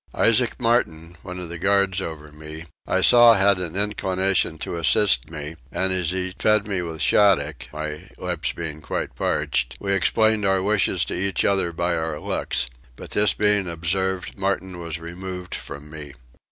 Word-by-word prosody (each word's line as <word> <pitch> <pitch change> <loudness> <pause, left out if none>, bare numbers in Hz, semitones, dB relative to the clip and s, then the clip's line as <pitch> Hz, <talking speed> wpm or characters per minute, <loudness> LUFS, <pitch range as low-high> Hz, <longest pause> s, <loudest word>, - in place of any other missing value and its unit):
Isaac 120 +2 +3
Martin, 85 -9 0
one 90 -1 -8
of 90 -2 -5
the 85 0 -6
guard 100 0 +2
over 75 -4 -7
me, 75 +1 -9 0.2
I 95 - +1
saw 120 +3 +7
had 100 -1 +3
an 90 -2 -3
inclination 95 -4 0
to 85 - -5
assist 85 - +3
me, 80 0 -7
and 95 0 +1
as 90 -3 0
he 95 0 -2
fed 105 -1 +3
me 100 -3 -2
with 80 -2 -4
shaddock 80 -9 +3
(my 75 0 -6
lips - - -1
being 80 -2 -6
quite - - -4
parched) - - -1
we 100 -1 -1
explained 110 +3 +2
our 95 -1 +2
wishes 105 -1 +1
to - - -5
each 95 -1 0
other 95 -3 +1
by 85 +1 -1
our 80 -2 -3
looks; 65 - -1 0.3
but - - -11
this 105 -1 +3
being 105 -2 +2
observed 90 +3 -2
Martin 95 -2 -2
was 85 -2 -5
removed 90 +2 -7
from 75 +2 -7
me. 75 -3 -8
90 Hz, 170 wpm, -23 LUFS, 80-100 Hz, 0.3 s, saw